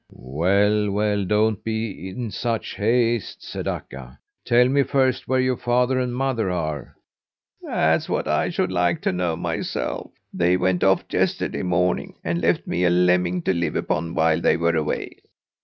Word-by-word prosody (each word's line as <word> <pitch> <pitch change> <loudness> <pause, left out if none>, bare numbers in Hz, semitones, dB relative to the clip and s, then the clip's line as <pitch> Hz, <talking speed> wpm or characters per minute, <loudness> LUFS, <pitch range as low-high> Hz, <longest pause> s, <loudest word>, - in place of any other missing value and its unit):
"Well, 100 - +1
well, 105 0 0
don't 105 +1 +1
be 110 -4 -4
in 115 +3 -5
such 115 +3 -3
haste," 115 +1 0
said - - -6
Akka. 65 -1 -6 0.3
"Tell 120 +1 +4
me 140 +2 +3
first 130 -1 +1
where 130 0 +2
your 130 -1 +1
father 125 +1 +1
and 125 -1 -2
mother 125 -6 0
are." 80 -6 -4 0.7
"That's 80 +1 +1
what - - -1
I - - +1
should - - -1
like 90 -1 +1
to - - +1
know 90 -2 -1
myself. 85 0 -3 0.2
They 90 +1 +2
went 90 -1 +1
off 95 0 +3
yesterday - - 0
morning 90 0 0
and 85 0 -1
left 85 +1 +1
me 90 - -1
a 90 - +4
lemming 90 0 +2
to - - +1
live 85 -3 -1
upon 85 +2 -2
while 80 -1 +2
they - - +3
were 85 0 +1
away. 75 -1 -2
95 Hz, 165 wpm, -23 LUFS, 85-115 Hz, 0.7 s, Tell